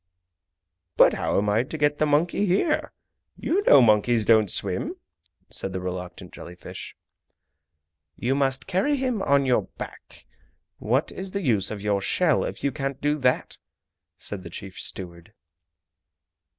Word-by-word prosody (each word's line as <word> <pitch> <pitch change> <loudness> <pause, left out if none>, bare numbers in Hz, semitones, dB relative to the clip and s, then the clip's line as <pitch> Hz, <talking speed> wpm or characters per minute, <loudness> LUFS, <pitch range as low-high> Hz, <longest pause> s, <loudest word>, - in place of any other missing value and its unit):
"But - - +7
how - - -1
am 105 - +1
I 105 +2 +3
to 135 +5 -6
get 145 0 +1
the 155 - +2
monkey 170 +7 +1
here? 305 - +1 0.5
You 380 +5 0
know 135 - +8
monkeys 110 +1 +3
don't 110 -3 +4
swim?" 90 0 -2 0.6
said 95 - -1
the 95 - -2
reluctant 90 0 -6
jelly 90 - -10
fish. 90 - -9 1.2
"You 125 +3 -1
must 135 -2 0
carry 195 +11 +1
him 255 -6 -1
on 140 -4 +3
your 125 -2 +3 0.2
back. - - -10 0.5
What 125 +7 0
is 190 +1 -6
the 200 +1 -3
use 110 - +2
of 105 -2 -6
your 100 -1 +1
shell 160 - +2
if - - -6
you 140 - +1
can't 135 -1 -4
do 150 +1 0
that!" 125 -1 0 0.6
said 100 -2 -7
the 90 - -9
chief 95 +2 -9
steward. 85 +1 -6
130 Hz, 150 wpm, -25 LUFS, 100-155 Hz, 1.2 s, know